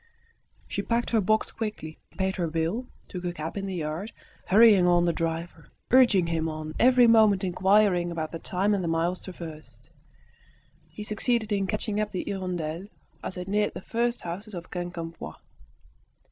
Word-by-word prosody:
She - - -2
packed 235 +1 -1
her 225 -2 +3
box 215 +3 +1
quickly, 210 -8 -5 0.2
paid 190 0 -1
her 175 -2 0
bill, 165 +10 -2 0.2
took 180 -1 -7
a 175 - -1
cab 160 -1 -6
in 195 -1 -3
the 190 - -4
yard, 165 +6 -4 0.4
hurrying 205 -2 +6
on 175 0 +4
the 170 - +2
driver, 165 0 -4 0.2
urging 235 -8 +6
him 165 -1 -1
on, 155 0 -6
every 250 0 +6
moment 220 -4 +5
inquiring 190 -1 +3
about 160 -2 -4
the 165 - -5
time 195 +5 0
and 195 -2 0
the - - -2
miles 165 +2 0
traversed. 165 -4 -10 1.0
He 210 - -8
succeeded 220 +1 0
in 200 -2 +1
catching 215 0 -2
up 215 0 0
the 185 - -3
"Hirondelle" 180 -2 -3 0.4
as 190 - -4
it 180 0 -5
neared 210 +1 0
the - - -6
first 235 +3 -1
houses 190 +5 -6
of 175 0 -8
Quincampoix. 170 - -6
185 Hz, 170 wpm, -27 LUFS, 170-210 Hz, 1.0 s, hurrying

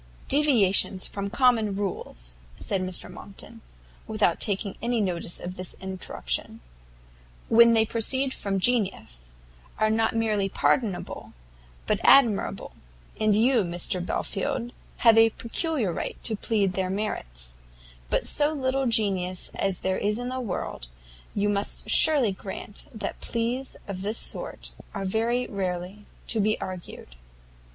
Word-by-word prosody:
"Deviations 215 -10 +4
from 200 0 -4
common 230 -3 +3
rules," - - -3 0.2
said 195 -2 -1
Mr 185 -1 0
Monckton, 225 +3 -10 0.5
without 210 -6 +1
taking 200 -1 +1
any 235 0 0
notice 175 -4 -1
of 180 +1 -7
this 185 0 -3
interruption, 185 - -4 0.9
"when 235 +1 +7
they 225 -1 +4
proceed 260 +4 +1
from 195 -1 -2
genius, 185 - 0 0.5
are 215 0 +2
not 225 +1 +1
merely 215 -3 +1
pardonable, 205 -1 -1 0.5
but - - +1
admirable; 240 -7 +4 0.5
and 215 -1 +3
you, 235 +2 +4
Belfield, 185 +6 -2 0.3
have 225 -2 +6
a 225 0 +7
peculiar 230 - -1
right - - -4
to 225 - +1
plead 200 -3 0
their 185 0 -1
merits; 60 - -4 0.6
but - - +1
so 295 +1 +2
little 270 -2 0
genius 190 -5 0
as 195 -2 -1
there 190 0 0
is 210 +1 +1
in 245 +1 -3
the 255 0 -3
world, 180 - -5 0.5
you 205 0 +1
must 205 0 -2
surely 285 -9 +6
grant 195 +1 -8
that 220 - -6
pleas 240 +3 -2
of 190 -2 -5
this 210 +3 -2
sort - - -2 0.2
are 195 -1 -3
very 230 +5 0
rarely 190 +1 -4 0.2
to 225 - 0
be 215 +1 +2
urged." 175 - -8
210 Hz, 130 wpm, -26 LUFS, 185-230 Hz, 0.9 s, when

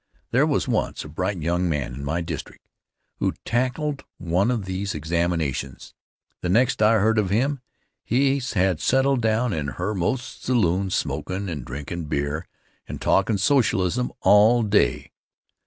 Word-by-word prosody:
There - - +3
was - - 0
once - - -1
a - - -9
bright 90 +2 -3
young 85 +2 0
man 70 -6 -2
in 70 +3 -7
my 80 +5 -1
district 80 -3 -7 0.5
who - - -1
tackled 130 +4 -1
one 90 +5 +1
of 115 -6 -1
these 95 0 -3
examinations. 80 -4 -2 0.5
The 90 - -2
next 120 +5 +2
I 110 +1 +5
heard 110 +1 +3
of 100 -3 0
him 130 +8 +1 0.4
he 135 +3 +2
had 95 - 0
settled 135 -1 +2
down 110 +1 +1
in 75 -3 -2
Herr 90 - -3
Most's 120 +8 -3
saloon 95 -6 +1
smokin' 90 +5 -2
and 75 -6 -4
drinkin' 75 +7 -6
beer 75 +3 -2 0.4
and - - -6
talkin' 110 - +2
socialism 115 -1 +2
all 110 +4 +5
day. 75 - +1
95 Hz, 150 wpm, -24 LUFS, 80-120 Hz, 0.5 s, I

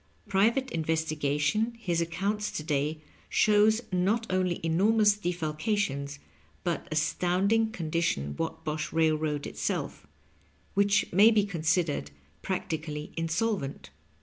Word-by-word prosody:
Private 225 +7 +2
investigation 160 +6 0
his 175 -7 -1
accounts 200 +5 -1
to 155 - -3
day 150 0 -1 0.3
shows 215 +2 +4
not 195 +6 +1
only 185 -2 0
enormous 205 +5 +4
defalcations 155 -5 -2 0.5
but 170 -1 -2
astounding 185 +8 +1
condi 165 -4 -2
tion 70 - -1
Whatbosh 155 -1 -3
Railroad 155 -2 +1
itself, - - -3 0.7
which 200 -1 +2
may 205 +5 +7
be 215 -3 +3
considered 165 - 0 0.3
practically 155 -5 -4
insolvent. 165 - -2
170 Hz, 100 wpm, -28 LUFS, 155-205 Hz, 0.7 s, may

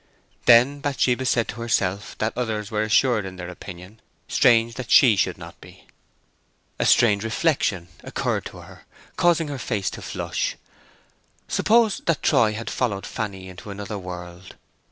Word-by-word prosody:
Then 125 +4 +6
Bathsheba 130 -2 0
said 115 -1 +1
to 115 - -6
herself 100 -4 -1
that 110 +1 -1
others 110 -4 -3
were 105 -1 0
assured 110 +1 +2
in 95 -1 -7
their 90 -1 -7
opinion; 90 +3 -11 0.3
strange 115 -1 +3
that 125 0 -7
she 120 -6 +6
should - - 0
not - - -12
be. - - -16 0.9
A - - +2
strange 105 -4 +4
reflection 110 - 0 0.2
occurred - - -2
to - - -9
her, - - -15 0.3
causing 170 -2 +2
her 140 -2 -5
face 105 -5 -2
to - - -8
flush. - - -3 0.9
Suppose 220 -1 +2
that 165 -3 +1
Troy 110 -2 +3
had 110 +2 -6
followed 105 -6 -2
Fanny 95 -4 -5
into 95 +3 -11
another 100 +1 -6
world. 90 0 -9
110 Hz, 155 wpm, -23 LUFS, 95-125 Hz, 0.9 s, Then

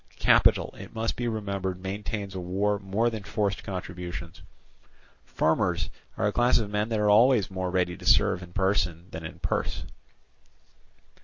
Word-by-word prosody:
Capital, - - +4
it - - -10
must 115 0 -1
be 120 - -2
remembered, 100 -4 -3
maintains 100 +1 -4
a 95 - -4
war 100 +3 0
more 105 +4 0
than 110 -2 -5
forced 100 -1 -2
contributions. 90 -2 -6 0.8
Farmers 85 -1 0 0.3
are - - 0
a 105 - +2
class 120 +1 +4
of 105 -3 -2
men 105 +2 0
that 110 -2 0
are 105 - +2
always 110 -2 +5
more 95 -1 -2
ready 90 -1 0
to - - -12
serve - - +4
in 90 -1 -10
person 90 -3 0
than 80 0 -6
in 80 - -7
purse. - - -2
100 Hz, 160 wpm, -27 LUFS, 90-105 Hz, 0.8 s, always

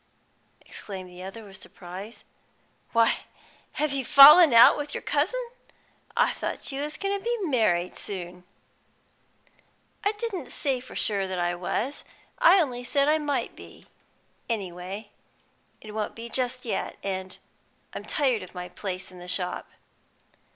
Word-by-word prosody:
exclaimed 190 -3 -8
the 180 0 -12
other, 195 +4 -8
with 195 -2 -11
surprise. 190 +5 -10 0.7
"Why, 230 -1 +4 0.6
have 305 -1 0
you 270 -1 -1
fallen 295 +5 +9
out 235 0 +8
with 290 0 -5
your - - -5
cousin? - - 0 0.7
I - - +3
thought - - -4
you 275 +1 -3
was 300 +1 -4
goin' 400 0 -1
to - - -17
be 475 +1 0
married 215 - +1
soon." 180 -2 -6 1.6
"I 410 - +2
didn't 415 - -5
say 270 -3 -1
for 250 - -12
sure 200 -3 0
that 185 -1 -4
I 175 0 0
was; 200 +10 -3 0.4
I 485 -6 +7
only 250 -7 -1
said 280 +3 +1
I 310 +1 +3
might 295 -2 -2
be. - - -13 0.6
Any 200 -6 -2
way 190 +4 -8 0.7
it 215 - -10
won't 215 0 -3
be 230 +1 -7
just 250 +1 -2
yet, 225 - -3
and 190 -1 -4 0.6
I'm - - -7
tired 260 -7 +1
of 185 0 -11
my 180 0 -6
place 185 0 -5
in 180 - -12
the 175 - -10
shop." 180 0 -2
225 Hz, 150 wpm, -26 LUFS, 185-285 Hz, 1.6 s, fallen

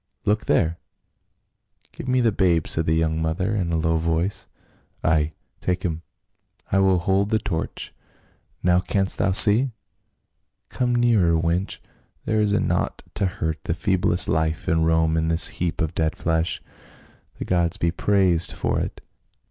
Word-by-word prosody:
Look 105 +1 +1
there 85 +1 +1 0.6
!" - - -31
"Give - - -9
me 130 0 +2
the 115 -2 +3
babe," 85 -5 +2
said 80 0 -1
the 80 - +2
young 80 0 0
mother, 80 +6 -1
in 90 -5 -1
a 85 - +1
low 80 0 +1
voice. 85 +4 -1 0.3
" - - -38
Ay, 80 0 +1 0.3
take 90 0 -2
him; 80 -2 -2 0.7
I 95 - +3
will 95 -1 +4
hold 95 +3 +1
the 110 - +2
torch. 95 -6 -4 0.7
Now, 90 0 +4
canst 95 +2 -1
thou 95 - +2
see? 115 +6 +5 1.0
Come 125 -1 0
nearer, 105 -9 +3
wench. 85 +3 -1 0.5
There 110 -1 +1
is 105 -1 +1
naught 105 - -1
to 100 - 0
hurt 80 -3 -4
the 80 - -1
feeblest 90 -3 +1
life 80 0 -1
in 80 0 +2
Rome 80 0 +2
in 80 0 0
this 80 0 +4
heap 85 -2 -3
of 80 -1 -1
dead 80 -1 -1
flesh. 80 +1 -1 0.7
The - - -5
gods 85 +1 0
be 85 -4 0
praised 90 -2 +2
for - - -1
it - - -5
85 Hz, 165 wpm, -23 LUFS, 80-100 Hz, 1.0 s, see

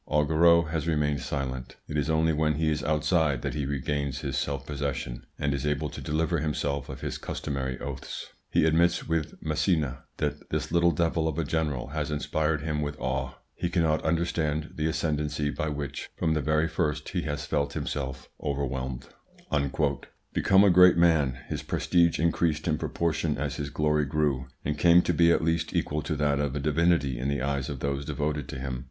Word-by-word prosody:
Augereau 80 +3 +5
has 80 0 -3
remained 75 -3 +1
silent; 65 -3 -4
it 75 - -5
is 75 +1 0
only 80 0 +3
when 75 0 +1
he 80 +1 +1
is 75 -1 -1
outside 75 -3 +1
that - - -2
he 70 -3 -2
regains 70 0 -2
his - - -3
self 70 -2 -2
possession 65 -4 -4
and 70 -1 0
is 70 - -2
able 75 0 -1
to - - -7
deliver 80 +2 0
himself 75 -3 -2
of - - -7
his - - -4
customary 65 -2 -3
oaths. 70 -3 -6 0.2
He - - +3
admits 85 +2 +3
with 80 -1 -1
Massena 75 -5 0
that - - -3
this - - -2
little 85 0 +4
devil 80 0 +1
of 80 - -2
a 85 - +1
general 75 -5 -1
has 75 0 -2
inspired 75 0 0
him 75 -2 -1
with 75 0 -4
awe; 65 0 -2 0.2
he 85 - -2
cannot 80 -3 +2
understand 80 -2 0
the 80 -1 -1
ascendency 75 -2 -1
by 75 - -2
which 70 -2 -5
from 80 - +1
the 75 - 0
very 75 +2 +2
first 75 -2 -1
he 90 - -1
has 75 -3 -3
felt 70 0 -1
himself 65 -2 -4
overwhelmed." 65 -3 -3 1.3
Become 95 0 +5
a 100 - +6
great 90 0 +7
man, 80 -7 +3
his - - -3
prestige 85 -2 +2
increased 80 -1 +1
in 75 -2 +1
proportion 80 -2 -1
as 70 -1 -2
his 70 -1 -3
glory 75 +1 +1
grew, 70 -3 0 0.2
and 75 0 -1
came 85 0 +6
to - - +1
be 85 0 +5
at 85 - +2
least 80 0 0
equal 75 +1 0
to 75 +2 -2
that 75 -1 +1
of 70 -1 -1
a - - -1
divinity 75 -3 +2
in 65 - -1
the 70 -2 -1
eyes 70 +1 -1
of 70 -3 -5
those 70 0 -1
devoted 75 -1 -2
to - - -5
him. 65 -1 -4
75 Hz, 190 wpm, -28 LUFS, 70-80 Hz, 1.3 s, great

